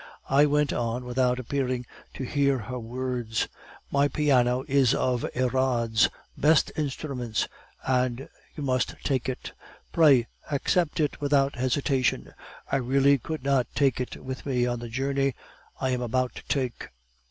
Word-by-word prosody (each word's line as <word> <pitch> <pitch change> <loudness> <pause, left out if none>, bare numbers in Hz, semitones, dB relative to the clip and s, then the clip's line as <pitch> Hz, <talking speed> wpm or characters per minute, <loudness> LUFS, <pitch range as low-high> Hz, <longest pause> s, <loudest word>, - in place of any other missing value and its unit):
I 140 +2 +5
went 150 0 +2
on 120 +1 -2
without 125 0 +1
appearing 130 -1 -2 0.3
to - - -4
hear 140 +1 +2
her 125 +2 -5
words: 120 -1 -2 0.4
"'My 140 +1 +3
piano 130 -4 +2
is 135 -3 +4
one - - 0
of 125 -2 0
Erard's 125 -3 +2 0.3
best 155 +2 +3
instruments; 135 -6 -2 0.4
and 130 0 0 0.3
you 150 - -5
must 130 -2 0
take 130 -2 0
it. 130 - -5 0.4
Pray 145 -8 +5 0.2
accept 155 +3 +1
it 150 -1 0
without 140 -1 +2
hesitation; 130 +1 0 0.4
I - - +3
really 135 +2 +3
could 155 +2 -5
not 135 -3 +2
take 135 -3 +2
it 125 - -5
with 130 0 -6
me 125 -3 +1
on 120 -1 -1
the 120 0 -7
journey 135 +2 0 0.4
I 130 - 0
am 125 -1 -1
about 125 +1 0
to - - +1
make. 125 -3 -4
130 Hz, 150 wpm, -27 LUFS, 125-140 Hz, 0.4 s, I